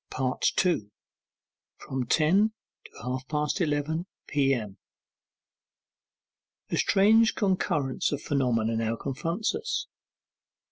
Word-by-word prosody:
2. 170 - +1 0.9
FROM 130 -2 -4
TEN 190 - +3 0.3
TO - - -13
HALF 130 +1 -4
PAST 150 +5 -1
ELEVEN 160 +2 -1 0.2
P.M. 135 -8 0 1.9
A - - +1
strange 220 +3 +4
concurrence 170 - 0
of 145 - -1
phenomena 120 -6 0
now 115 0 0
confronts 165 - -2
us. 445 +2 -2
145 Hz, 90 wpm, -27 LUFS, 130-185 Hz, 1.9 s, strange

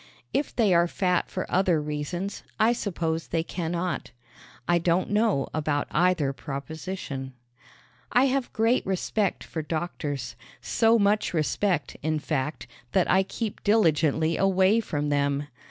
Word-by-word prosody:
If 285 - -1
they 215 -6 +3
are 170 0 +4
fat 180 0 0
for 185 - -3
other 180 -3 +2
reasons 150 +6 -4 0.2
I 225 +2 +5
suppose 165 -8 -2
they 165 -1 0
cannot. 175 +1 -3 0.6
I 175 0 +3
don't 175 +3 +1
know 210 -10 +2
about 145 -2 0
either 170 -4 +2
proposition. 140 -1 -6 0.8
I 250 +2 +5
have 270 -1 0
great 225 +3 +2
respect 195 +1 -1
for 160 - -5
doctors 155 -3 -4 0.2
so 225 +1 +3
much 205 -3 +2
respect, 160 -1 0
in 155 +1 0
fact, 150 -1 -2 0.3
that 190 - +3
I 190 - +5
keep 210 +2 -4
diligently 160 -6 +3
away 195 +3 +4
from 150 -9 -2
them. 140 0 +1
175 Hz, 135 wpm, -26 LUFS, 150-200 Hz, 0.8 s, I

